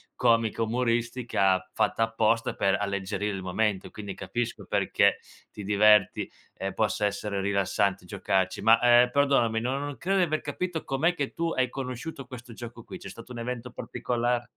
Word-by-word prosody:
comica 115 Hz, -2 st, +2 dB
umoristica 115 Hz, -5 st, 0 dB
fatta 115 Hz, -, +1 dB
apposta 115 Hz, 0 st, +1 dB
per 95 Hz, -, +2 dB
alleggerire 100 Hz, 0 st, -2 dB
il 95 Hz, -, -5 dB
momento. 95 Hz, +1 st, -1 dB
Quindi 100 Hz, -2 st, -7 dB
capisco 115 Hz, +5 st, -4 dB
perché -, -, +2 dB, 0.3 s
ti 105 Hz, -, -8 dB
diverti, 105 Hz, 0 st, +4 dB, 0.3 s
ehm, 95 Hz, 0 st, -3 dB
possa 105 Hz, 0 st, 0 dB
essere 100 Hz, 0 st, -2 dB
rilassante 100 Hz, -1 st, 0 dB
giocarci. 95 Hz, -1 st, -1 dB
Ma, 115 Hz, +1 st, +6 dB
ehm, 120 Hz, 0 st, +6 dB
perdonami, 125 Hz, -5 st, +2 dB
no 130 Hz, +3 st, -1 dB
non 145 Hz, -1 st, -5 dB
credo 195 Hz, +2 st, 0 dB
di 185 Hz, -, +4 dB
aver 155 Hz, -2 st, 0 dB
capito 165 Hz, +3 st, -3 dB
com'è 155 Hz, +6 st, +1 dB
che 145 Hz, -5 st, -3 dB
tu 165 Hz, 0 st, -1 dB
hai 130 Hz, -1 st, +1 dB
conosciuto 135 Hz, +2 st, -6 dB
questo 120 Hz, -2 st, -10 dB
gioco 120 Hz, 0 st, -9 dB
qui. 185 Hz, -, -9 dB
C'è -, -, -9 dB
stato 115 Hz, +2 st, -11 dB
un 120 Hz, -, -6 dB
evento 125 Hz, 0 st, -5 dB
particola 120 Hz, 0 st, -2 dB
115 Hz, 165 wpm, -27 LUFS, 100-125 Hz, 0.3 s, Ma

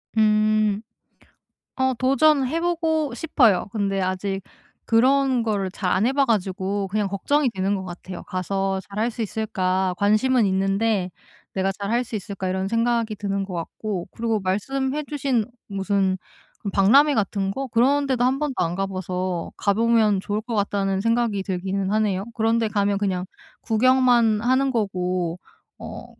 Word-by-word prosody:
음. 215 Hz, -1 st, +3 dB, 1.0 s
어 260 Hz, 0 st, +2 dB
도전해 275 Hz, +4 st, +2 dB
보고 320 Hz, -5 st, 0 dB
싶어요. 245 Hz, -, +3 dB
근데 200 Hz, -3 st, -1 dB
아직 190 Hz, +1 st, -2 dB, 0.5 s
그런 260 Hz, +2 st, +3 dB
거를 205 Hz, -4 st, -1 dB
잘 185 Hz, -2 st, -2 dB
안 205 Hz, +5 st, +2 dB
해 260 Hz, -, +2 dB
봐 280 Hz, 0 st, +3 dB
가지고 200 Hz, -3 st, -1 dB
그냥 205 Hz, +1 st, -1 dB
걱정이 265 Hz, +8 st, +1 dB
되는 195 Hz, -1 st, -1 dB
거 190 Hz, -, -3 dB
같아요. 180 Hz, 0 st, -8 dB
'가서 195 Hz, +1 st, -1 dB
잘 200 Hz, 0 st, -7 dB
할 230 Hz, +2 st, +1 dB
수 235 Hz, 0 st, -5 dB
있을까 190 Hz, -4 st, -1 dB
관심은 215 Hz, +3 st, +3 dB
있는데 195 Hz, 0 st, +1 dB, 0.4 s
내가 195 Hz, 0 st, 0 dB
잘 200 Hz, +1 st, -5 dB
할 240 Hz, +2 st, +1 dB
수 230 Hz, -, -9 dB
있을까.' 195 Hz, -2 st, -4 dB
이런 190 Hz, +1 st, -1 dB
생각이 230 Hz, -1 st, 0 dB
드는 200 Hz, -1 st, -2 dB
것 190 Hz, -2 st, -7 dB
같고 175 Hz, +2 st, -4 dB
그리고 225 Hz, -1 st, -1 dB
말씀해 265 Hz, +10 st, -1 dB
주신 275 Hz, -6 st, 0 dB, 0.2 s
무슨 195 Hz, -1 st, 0 dB, 0.6 s
박람회 275 Hz, +11 st, +5 dB
같은 200 Hz, -3 st, 0 dB
거 270 Hz, +7 st, -3 dB
그런 270 Hz, +4 st, +2 dB
데도 255 Hz, -2 st, 0 dB
한번도 270 Hz, +2 st, 0 dB
안 170 Hz, +1 st, -2 dB
가봐서 185 Hz, -2 st, -3 dB
가보면 215 Hz, -1 st, +2 dB
좋을 205 Hz, +2 st, -2 dB
것 235 Hz, +1 st, -5 dB
같다는 200 Hz, -2 st, 0 dB
생각이 230 Hz, -2 st, +1 dB
들기는 190 Hz, +1 st, -2 dB
하네요. 205 Hz, -3 st, +1 dB
그런데 225 Hz, 0 st, +1 dB
가면 200 Hz, -1 st, +1 dB
그냥 190 Hz, -3 st, -1 dB, 0.4 s
구경만 240 Hz, -2 st, +3 dB
하는 260 Hz, +3 st, +2 dB
거고 180 Hz, -6 st, -1 dB, 0.4 s
어 -, -, -8 dB
210 Hz, 295 characters per minute, -23 LUFS, 195-240 Hz, 1.0 s, 박람회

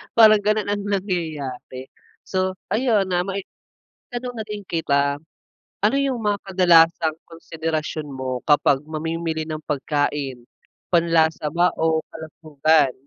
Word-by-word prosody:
parang 215 Hz, -2 st, +7 dB
ganon 210 Hz, 0 st, 0 dB
ang 205 Hz, -, -1 dB
nangyayari. 155 Hz, -10 st, -4 dB, 0.3 s
So 185 Hz, 0 st, -1 dB, 0.2 s
ayun 215 Hz, -5 st, +2 dB
na, 175 Hz, 0 st, +2 dB
may 195 Hz, 0 st, -3 dB, 0.7 s
tanong 245 Hz, 0 st, -4 dB
na 220 Hz, -, -4 dB
din 210 Hz, -1 st, -6 dB
kita. 140 Hz, -6 st, 0 dB, 0.6 s
Ano 215 Hz, +6 st, +3 dB
yung 270 Hz, -4 st, 0 dB
mga 205 Hz, -1 st, +1 dB
kadalasang 170 Hz, -4 st, +4 dB
konsiderasyon 160 Hz, -2 st, -4 dB
mo 130 Hz, -2 st, -4 dB
kapag 145 Hz, -1 st, +3 dB
mamimili 160 Hz, 0 st, -3 dB
ng 155 Hz, 0 st, -4 dB
pagkain? 145 Hz, -3 st, -2 dB, 0.5 s
Panlasa 160 Hz, -2 st, +2 dB
ba 175 Hz, +2 st, +2 dB
o 160 Hz, -1 st, +1 dB
kalusugan? 155 Hz, -3 st, +1 dB
165 Hz, 120 wpm, -22 LUFS, 150-195 Hz, 0.7 s, parang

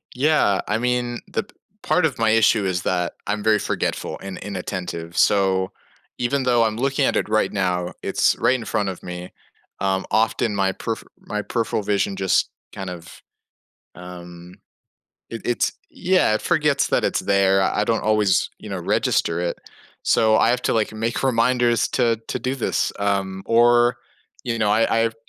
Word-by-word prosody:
Yeah, 135 Hz, -8 st, +2 dB
I 105 Hz, -, +1 dB
mean, 120 Hz, 0 st, -1 dB
the -, -, -2 dB
p 200 Hz, -, -24 dB, 0.3 s
part 180 Hz, -, +2 dB
of 150 Hz, -, -1 dB
my 115 Hz, -1 st, +3 dB
issue 110 Hz, -1 st, +4 dB
is 90 Hz, -1 st, -1 dB
that 90 Hz, -1 st, 0 dB, 0.2 s
I'm 105 Hz, 0 st, -2 dB
very 110 Hz, -1 st, +3 dB
forgetful -, -, -2 dB
and 95 Hz, -1 st, -7 dB
inattentive. 90 Hz, -4 st, -5 dB
So, 95 Hz, -2 st, +2 dB, 0.5 s
even 130 Hz, +3 st, 0 dB
though 120 Hz, -2 st, +3 dB
I'm 110 Hz, -1 st, -1 dB
looking 135 Hz, +2 st, +1 dB
at -, -, +1 dB
it -, -, 0 dB
right 110 Hz, 0 st, +1 dB
now, 90 Hz, -3 st, -1 dB
it's -, -, +2 dB
right 130 Hz, -, +3 dB
in 120 Hz, -3 st, -5 dB
front 105 Hz, -2 st, -1 dB
of 95 Hz, -, -7 dB
me. 90 Hz, 0 st, -7 dB, 0.5 s
Um, 95 Hz, -1 st, 0 dB
often, 110 Hz, -1 st, +1 dB
my 95 Hz, -1 st, +1 dB
perf 115 Hz, +2 st, -4 dB, 0.2 s
my 105 Hz, -2 st, -4 dB
peripheral 115 Hz, 0 st, -2 dB
vision 100 Hz, -1 st, 0 dB
just 95 Hz, -1 st, +1 dB, 0.2 s
kind 95 Hz, -1 st, -6 dB
of, 85 Hz, -1 st, -10 dB, 0.7 s
um, 90 Hz, 0 st, -11 dB, 0.8 s
it 115 Hz, -, -6 dB
it's 120 Hz, -, 0 dB, 0.2 s
yeah, 185 Hz, -12 st, +2 dB
it -, -, -2 dB
forgets 150 Hz, -5 st, +2 dB
that -, -, +1 dB
it's -, -, +1 dB
there, 95 Hz, -1 st, +3 dB
I 105 Hz, -, +1 dB
don't 115 Hz, +1 st, 0 dB
always, 105 Hz, -3 st, +2 dB
you -, -, -10 dB
know, -, -, -4 dB
register 85 Hz, +1 st, 0 dB
it. 85 Hz, -1 st, -2 dB, 0.4 s
So, 110 Hz, -1 st, +3 dB
I 115 Hz, -, +4 dB
have 125 Hz, +1 st, +1 dB
to, -, -, +1 dB
like, 110 Hz, -1 st, 0 dB
make 115 Hz, +2 st, -2 dB
reminders 120 Hz, -2 st, +2 dB
to 120 Hz, -3 st, +2 dB
to -, -, -2 dB
do 130 Hz, +1 st, -2 dB
this, 125 Hz, -, -1 dB
um, 100 Hz, -1 st, -1 dB
or, 120 Hz, +1 st, +4 dB, 0.5 s
you 115 Hz, -2 st, -2 dB
know, 105 Hz, -2 st, +2 dB
I 115 Hz, +1 st, +3 dB
I've 115 Hz, 0 st, -1 dB
110 Hz, 175 wpm, -22 LUFS, 95-120 Hz, 0.8 s, issue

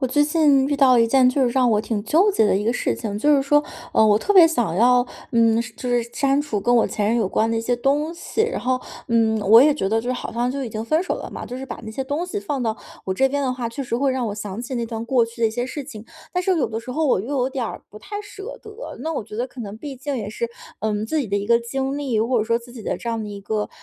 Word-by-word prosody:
我 260 Hz, -, +1 dB
最 290 Hz, +4 st, +2 dB
近 290 Hz, -3 st, +3 dB
遇 285 Hz, -, 0 dB
到 265 Hz, -3 st, +5 dB
一 230 Hz, -, +5 dB
件 255 Hz, +1 st, +5 dB
就 265 Hz, +2 st, +1 dB
是 250 Hz, -, +3 dB
让 255 Hz, 0 st, +3 dB
我 210 Hz, -, +3 dB
挺 215 Hz, -1 st, -3 dB
纠 350 Hz, -, +4 dB
结 220 Hz, -, +3 dB
的 195 Hz, -, +3 dB
一 205 Hz, -, -1 dB
个 230 Hz, -, +2 dB
事 -, -, -1 dB
情， 210 Hz, -3 st, -4 dB
就 295 Hz, +5 st, +4 dB
是 275 Hz, -, +2 dB
说， 295 Hz, +2 st, +3 dB, 0.3 s
呃， 220 Hz, -, +5 dB
我 210 Hz, -1 st, +5 dB
特 410 Hz, -, 0 dB
别 365 Hz, -4 st, +9 dB
想 240 Hz, -, 0 dB
要， 245 Hz, +3 st, +5 dB, 0.3 s
嗯， 230 Hz, -1 st, +4 dB
是 230 Hz, -1 st, -6 dB
就 250 Hz, -, -5 dB
是 245 Hz, -1 st, +2 dB
删 275 Hz, 0 st, +2 dB
除 260 Hz, -9 st, -2 dB
跟 240 Hz, +4 st, +2 dB
我 230 Hz, -, +4 dB
前 205 Hz, -, -2 dB
任 235 Hz, -, +2 dB
有 220 Hz, -5 st, +1 dB
关 225 Hz, +3 st, +1 dB
的 230 Hz, -, 0 dB
一 -, -, 0 dB
些 245 Hz, +2 st, 0 dB
东 290 Hz, +6 st, 0 dB
西。 360 Hz, +5 st, -2 dB
然 465 Hz, +2 st, -1 dB
后， 255 Hz, +1 st, 0 dB, 0.3 s
嗯， 225 Hz, -1 st, +2 dB
我 210 Hz, +3 st, +7 dB
也 295 Hz, +1 st, +4 dB
觉 195 Hz, -10 st, -1 dB
得 225 Hz, +2 st, +1 dB
就 245 Hz, +2 st, -2 dB
好 240 Hz, -, -6 dB
像 240 Hz, +2 st, 0 dB
就 275 Hz, +1 st, -3 dB
已 -, -, -4 dB
经 220 Hz, 0 st, -5 dB
分 310 Hz, +8 st, +1 dB
手 370 Hz, -, -2 dB
了 -, -, -6 dB
嘛， -, -, -7 dB
就 250 Hz, -, -6 dB
是 265 Hz, -, -7 dB
把 -, -, -7 dB
那 220 Hz, -, -6 dB
些 265 Hz, +5 st, -4 dB
东 290 Hz, +6 st, -2 dB
西 410 Hz, +3 st, -3 dB
放 285 Hz, -8 st, -3 dB
到 220 Hz, -2 st, -1 dB, 0.3 s
我 190 Hz, -, -1 dB
这 270 Hz, +7 st, +3 dB
边 285 Hz, +1 st, -1 dB
的 260 Hz, -2 st, 0 dB
话， 250 Hz, -2 st, -3 dB
确 230 Hz, +4 st, -5 dB
实 240 Hz, -3 st, -2 dB
会 270 Hz, +1 st, +1 dB
让 255 Hz, -2 st, -1 dB
我 205 Hz, -, -4 dB
想 205 Hz, 0 st, -6 dB
起 250 Hz, +2 st, -5 dB
那 235 Hz, -1 st, -2 dB
段 225 Hz, 0 st, -5 dB
过 240 Hz, 0 st, +3 dB
去 230 Hz, +1 st, -11 dB
的 -, -, +6 dB
一 -, -, -6 dB
些 245 Hz, +2 st, -2 dB
事 290 Hz, +3 st, -5 dB
情。 225 Hz, -6 st, -10 dB, 0.3 s
但 360 Hz, -, 0 dB
是 370 Hz, 0 st, +2 dB
有 300 Hz, -, +1 dB
的 220 Hz, -, -3 dB
时 235 Hz, -, -9 dB
候 315 Hz, +4 st, 0 dB
我 255 Hz, -, +3 dB
又 220 Hz, -, -7 dB
有 255 Hz, 0 st, 0 dB
点 260 Hz, -3 st, -2 dB
儿 -, -, -7 dB
不 210 Hz, -, -11 dB
太 410 Hz, -, -6 dB
舍 415 Hz, +3 st, -9 dB
得， 435 Hz, +3 st, -9 dB
那 325 Hz, -, -2 dB
我 260 Hz, -, -3 dB
觉 210 Hz, -, -9 dB
得 240 Hz, +3 st, -1 dB
可 255 Hz, -, -11 dB
能 205 Hz, -2 st, -6 dB
毕 280 Hz, +2 st, -7 dB
竟 275 Hz, +2 st, -4 dB
也 210 Hz, -4 st, -4 dB
是， 470 Hz, -, -3 dB, 0.3 s
嗯， 215 Hz, -1 st, -1 dB
自 315 Hz, +7 st, -1 dB
己 280 Hz, -, -1 dB
的 200 Hz, -1 st, -1 dB
一 200 Hz, -, -2 dB
个 235 Hz, +1 st, +5 dB
经 270 Hz, +4 st, -3 dB
历， 260 Hz, -7 st, 0 dB
或 235 Hz, +2 st, +1 dB
者 215 Hz, -, 0 dB
说 230 Hz, +1 st, +1 dB
自 240 Hz, 0 st, -14 dB
己 235 Hz, -3 st, -9 dB
的 -, -, -2 dB
这 235 Hz, -, -7 dB
样 230 Hz, -1 st, -2 dB
的 210 Hz, -, -6 dB
一 200 Hz, -1 st, -7 dB
个， 210 Hz, +1 st, -2 dB
245 Hz, 345 characters per minute, -22 LUFS, 225-280 Hz, 0.3 s, 别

